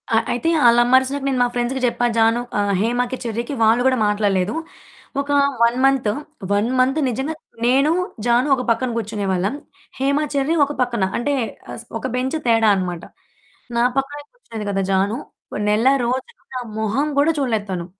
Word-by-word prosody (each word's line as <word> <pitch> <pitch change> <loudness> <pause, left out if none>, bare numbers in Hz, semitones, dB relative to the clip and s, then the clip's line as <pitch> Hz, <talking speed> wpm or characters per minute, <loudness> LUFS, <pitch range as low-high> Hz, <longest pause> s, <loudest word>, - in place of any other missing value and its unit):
ఆ! - - +5 0.2
అయితే 245 +7 0 0.2
ఆళ్ల 235 0 +6
అమ్మరిసినాక 260 +3 +2
నేను 265 -2 0
మా - - +2
ఫ్రెండ్స్‌కి 245 +2 -1
జెప్పా 245 0 0
జాను 225 +1 +3 0.2
ఆహ్, 205 0 +1
హేమ‌కి, 245 +3 0
చెర్రీకి 235 +3 -3
వాళ్ళు 225 +2 +4
గూడా 260 -1 +3
మాట్లాడలేదు. 205 0 0 0.7
ఒక 280 - -9 0.3
1 235 +1 +3
మంత్, 270 -5 +2 0.4
1 205 +3 +1
మంత్ 265 +4 +2
నిజంగా 265 +6 -3 0.3
నేను, 275 +5 +3 0.3
జాను 240 +3 +3
ఒక 250 - -3
పక్కన 250 +2 +1
కూర్చునే 215 -2 -3
వాళ్ళం. 190 +6 0 0.4
హేమ, 275 +2 +1 0.2
చెర్రీ 280 +3 +1
ఒక 290 - -5
పక్కన. 240 -5 0
అంటే, 285 +5 -1 0.4
అస్ 235 - -8 0.2
ఒక 260 - -3
బెంచ్ 260 +5 -1
తేడా 225 -2 +4
అన్నమాట. 180 -3 -3 0.7
నా 235 - +3
పక్కనే 290 +2 -2
కూర్చునేది 225 - -8
గదా! 195 0 0
జాను 195 +4 +1 0.5
నెల 215 +4 +2 0.2
రోజులు 260 - -4
నా - - -1 0.2
మొహం 220 +7 0
గూడా 290 +3 +4
చూడలేదు 225 -7 0
తను. 175 -2 -3
240 Hz, 165 wpm, -20 LUFS, 220-270 Hz, 0.7 s, ఆళ్ల